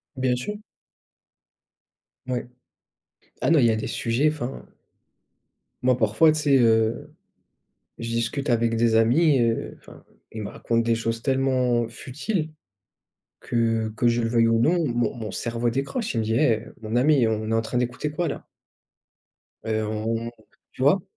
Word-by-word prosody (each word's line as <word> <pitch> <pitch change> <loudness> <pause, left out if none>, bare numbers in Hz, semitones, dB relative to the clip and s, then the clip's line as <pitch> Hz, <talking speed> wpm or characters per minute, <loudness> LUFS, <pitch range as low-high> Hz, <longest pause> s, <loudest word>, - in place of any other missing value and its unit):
Bien 130 -1 +1
sûr. 125 +12 -4 1.7
Oui. 125 -1 -1 1.0
Ah - - +1
non, 165 -1 +5
il 125 - +4
y 115 - +4
a - - +1
des 110 - -3
sujets 120 +6 +1
enfin 135 -4 -5 1.2
moi 125 -1 +3
parfois 120 +8 +4
tu 155 - -1
sais, 140 -2 +4
heu, 115 -1 +2 0.9
je 115 - -5
discute 115 +5 -2
avec 115 -1 +2
des 115 -1 +3
amis, 135 +7 +4
heu, 115 -1 0
enfin, - - -16 0.3
ils 110 - -6
me 100 - -5
racontent 115 +2 -1
des 115 0 +1
choses 115 0 -2
tellement 130 -3 +1
futiles 155 - -4 0.9
que, 115 -2 0
que 120 - +1
je 120 0 +1
le 115 - 0
veuille 115 0 +3
ou 115 0 +2
non, 165 +6 +2
mon 120 -2 0
mon 110 -3 -5
cerveau 115 +2 -2
décroche. 140 - -3
Il - - 0
me - - -1
dit: 110 +1 -1
«Eh, 110 -3 +3
heu, - - -14
mon 110 0 -5
ami, 135 -1 +4
on 110 0 -2
est - - +1
en 115 - +2
train 115 +2 -2
d'écouter 125 +4 -2
quoi 170 +3 -1
là?» - - -6 1.2
«Heu, 110 -1 -1
on 110 +2 -2
on», - - -6 0.4
tu - - -9
vois? 155 +7 +4
120 Hz, 170 wpm, -24 LUFS, 115-135 Hz, 1.7 s, non